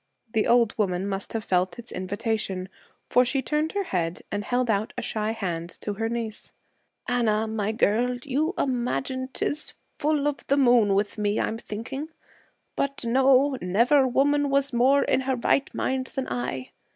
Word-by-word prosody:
The 220 -2 +2
old 235 -2 +4
woman 190 -2 0
must 195 0 -4
have 225 -1 -2
felt 180 -1 0
its 240 0 -8
invitation, 195 -1 -2 0.4
for 250 - +5
she 265 +2 0
turned 300 +4 0
her 405 -1 0
head 175 - -2
and 205 0 -2
held 245 +3 0
out 215 0 0
a - - -1
shy 215 -1 -1
hand 175 -6 -3
to 210 - -3
her 225 +2 -2
niece. 230 -2 -4 0.6
'Anna, 220 -3 +1
my 215 -1 -1
girl, 235 +3 +1
you 305 +7 0
imagine 260 0 -1
'tis 300 +3 -1
the - - -7 0.3
full 295 -1 +1
o' 295 - +1
the 280 - +3
moon 240 -7 +5
with 205 +2 -1
me, 205 0 +1
I'm 225 - -1
thinking. 245 +8 -6 0.7
But, 275 -3 -2
no, 265 +2 +4
never 240 +10 +3
woman 285 +3 +2
was 275 -1 +2
more 265 +4 +4
in - - +2
her 265 0 0
right 265 +3 +1
mind 260 0 -1
than 265 -1 -4
I. 125 +1 -3
235 Hz, 175 wpm, -26 LUFS, 205-270 Hz, 0.7 s, for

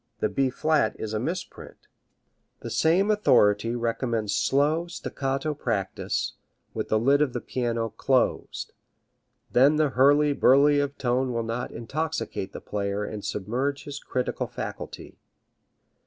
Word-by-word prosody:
The - - +1
B 135 -1 +1
flat 155 +3 +1
is 110 -1 -4
a 110 - 0
misprint. 165 +10 -6 0.7
The - - -6
same 185 +6 +3
authority 115 - +3
recommends 115 -2 -1
slow 150 +5 +2
staccato 135 -3 -3
practice, 105 -9 -2 0.4
with - - -4
the 110 - +3
lid 140 +6 +3
of 140 -5 +1
the 120 - -2
piano 115 -2 -2
closed. 130 +4 0 0.8
Then 140 +5 +5
the 150 -1 +2
hurly 145 +3 +4
burly 145 +2 +5
of 145 0 -2
tone 125 0 0
will 115 0 -1
not 115 +2 -3
intoxicate 145 -4 -4
the - - -7
player 100 0 -2
and 105 -1 -6
submerge 130 +7 -2
his 145 -1 -6
critical 125 -3 -2
faculty. - - -7
130 Hz, 135 wpm, -26 LUFS, 115-145 Hz, 0.8 s, Then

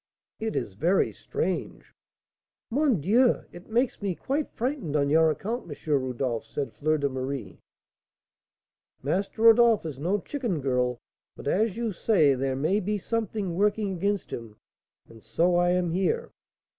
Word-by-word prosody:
"It 220 0 -3
is 110 -6 -2
very 170 - +2
strange." - - -4 0.8
"Mon 265 - +2
Dieu! 230 - +3
it 175 +4 -13
makes 240 +2 0
me 195 -3 -1
quite 280 - -2
frightened 245 - -3
on 140 -1 +2
your 160 +1 +5
account, 210 - -3
M. 150 +1 -3
Rodolph," 125 -2 -2
said 135 +5 -5
Fleur 155 +1 +1
de 140 -1 0
Marie. 130 0 -5 1.4
"Master 195 - -1
Rodolph 230 -3 +6
is 145 -4 -5
no 180 +7 +1
chicken, 235 - -3
girl; 125 -2 0 0.4
but - - -9
as 210 +6 +1
you 235 -2 -1
say, 170 -7 +3
there 135 0 -1
may 160 +10 +1
be 210 +1 -1
something 210 -3 -2
working 205 +2 +1
against 200 +2 -1
him, 115 -3 -7 0.5
and 115 -1 -15
so 170 +12 +1
I 175 0 +3
am 180 -1 +1
here." 455 - 0
180 Hz, 150 wpm, -27 LUFS, 140-220 Hz, 1.4 s, Rodolph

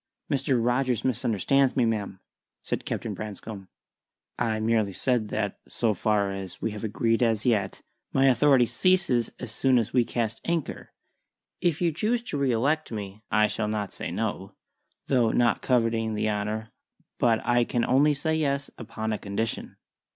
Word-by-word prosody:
"Mr. 135 -1 +1
Rogers 125 0 +1
misunderstands 130 +2 +2
me, 125 - +3
ma'am," 105 -4 -2 0.4
said - - -3
Captain - - -3
Branscome. 105 -1 -7 0.7
"I 110 -2 0
merely 110 -3 +1
said 120 +1 0
that, 105 -1 -2
so 115 -3 0
far 100 0 +1
as 95 -2 -6
we 115 - -2
have 105 +1 -7
agreed 115 +2 0
as 115 -3 +2
yet, 105 -6 0 0.3
My 135 0 +3
authority 135 0 +5
ceases 125 - +2
an - - -5
soon 125 +3 +2
as 115 0 0
we 125 -2 +4
cast 115 -1 -2
anchor. 170 -3 -3 0.7
If 175 -1 0
you 170 - +3
choose 225 +9 0
to 240 - -4
re 135 -2 +2
elect 145 +7 0
me, 105 -1 -6
I 105 - +4
shall 105 0 -2
not 105 -2 -3
say - - -5
'No' 95 0 -3 0.5
though 120 -4 +3
not 120 -1 +2
coveting 115 -3 +1
the 110 0 0
honour; 105 +2 -3 0.5
but 115 -2 +3
I 120 0 +3
can 120 0 0
only 145 +4 +4
say 160 +3 -1
'Yes' 140 -3 -1
upon 110 -1 -4
a 105 - -3
condition." 105 +3 -3
115 Hz, 165 wpm, -26 LUFS, 105-130 Hz, 0.7 s, authority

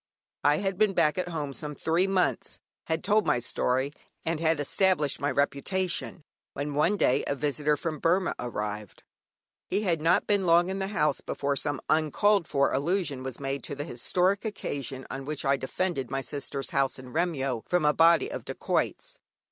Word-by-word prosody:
I 145 +1 +4
had 195 0 -2
been 210 -3 +3
back 150 +3 +3
at 180 - -1
home 150 -5 -4
some 150 +1 -6
three 170 +6 +1
months, 190 -2 0 0.3
had 160 0 -1
told 210 +1 +2
my - - +3
story, 130 +3 -1 0.3
and 165 -1 -1
had 160 -1 +2
established 150 -1 +2
my 145 - 0
reputation, 165 +5 -1 0.3
when 145 +1 -3
one 150 +8 +2
day 130 - +2
a 140 - 0
visitor 150 +1 0
from 155 0 -3
Burmah 180 +4 +2
arrived. 105 -4 -5 0.6
He 200 +3 0
had 170 -6 +1
not 165 +3 +3
been 200 -3 +1
long 170 +2 +5
in 195 - -3
the 190 - -1
house 150 -8 +1
before 140 0 -2
some 145 +1 -1
uncalled 165 +5 +2
for 140 -1 +2
allusion 150 -1 0
was 130 -2 -5
made 135 0 -3
to 140 - -4
the 145 - -4
historic 180 +9 0
occasion 140 - -4
on 135 0 -5
which 145 +1 -4
I 140 0 +4
defended 135 0 -2
my 135 0 -2
sister's 140 +1 -5
house 135 -1 +1
in 130 -1 -11
Remyo 140 -8 0
from 180 -3 +2
a 150 - +4
body 170 - +4
of - - -5
dacoits. - - -2
150 Hz, 180 wpm, -28 LUFS, 140-180 Hz, 0.6 s, long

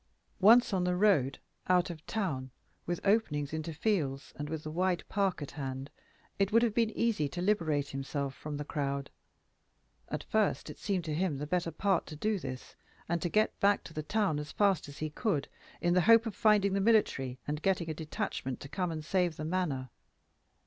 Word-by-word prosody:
Once 225 +3 +6
on 185 -2 +2
the 180 0 +1
road, 180 -9 +3 0.3
out 180 0 +3
of 160 -2 -10
town, 145 -12 -2 0.4
with 175 0 -1
openings 160 -9 +1
into 160 +1 -3
fields 150 -6 -1
and 150 0 -5
with 160 -1 -4
the 155 - -5
wide 180 +1 0
park 190 -5 0
at 140 - -7
hand, 135 -1 -5 0.5
it 195 +1 +2
would 230 +2 +5
have 230 -3 +2
been 230 -1 +2
easy 210 -11 +1
to 175 - -6
liberate 165 -7 +1
himself 135 0 -3
from 150 +1 -6
the 150 - -4
crowd. 140 -1 -2 1.0
At - - -3
first 215 -2 0
it - - -13
seemed 190 -5 -1
to 155 - -2
him 165 -2 0
the 145 - -4
better 175 +2 0
part 195 0 0
to 155 - -7
do 210 +6 0
this, 130 -5 -7 0.3
and 170 0 -1
to 175 - -1
get 215 +5 +1
back 200 0 +3
to 165 - -11
the 155 - -3
town 200 -3 0
as 150 -1 -6
fast 195 -7 +2
as 145 - -11
he 155 0 -3
could, 155 - -1 0.3
in 175 0 +2
the 180 - +4
hope 230 +5 +6
of 225 - -3
finding 210 -2 +3
the 195 - +1
military 195 - +2
and 150 +1 -2
getting 180 -3 +1
a 160 - -2
detachment 155 - -4
to 140 - -8
come 180 +2 -1
and 155 -1 -5
save 180 -2 +1
the 155 - -5
Manor. 155 -8 -1
170 Hz, 205 wpm, -31 LUFS, 145-200 Hz, 1.0 s, Once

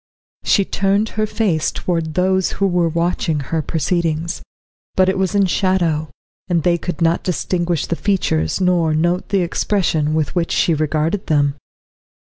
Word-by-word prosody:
She 200 - +3
turned 200 +3 +1
her 215 0 -1
face 195 -9 0
towards 165 -3 -2
those 185 +1 +1
who 195 - 0
were 175 -3 +2
watching 170 -1 0
her 155 +3 -2
proceedings, 165 +1 -1 0.5
but 185 0 +4
it 190 - +1
was 190 +1 0
in 200 -1 +4
shadow, 175 -5 0 0.4
and 170 -4 +1
they 170 -1 +2
could 180 0 -3
not 165 +1 +2
distinguish 175 -2 -1
the 170 - -2
features 165 - 0
nor 175 -4 +2
note 175 +3 0
the 195 -2 +2
expression 170 -3 0
with 155 -2 -1
which 170 -2 -1
she 170 - +2
regarded 155 +5 -1
them. 145 -3 +2
170 Hz, 155 wpm, -19 LUFS, 160-190 Hz, 0.5 s, but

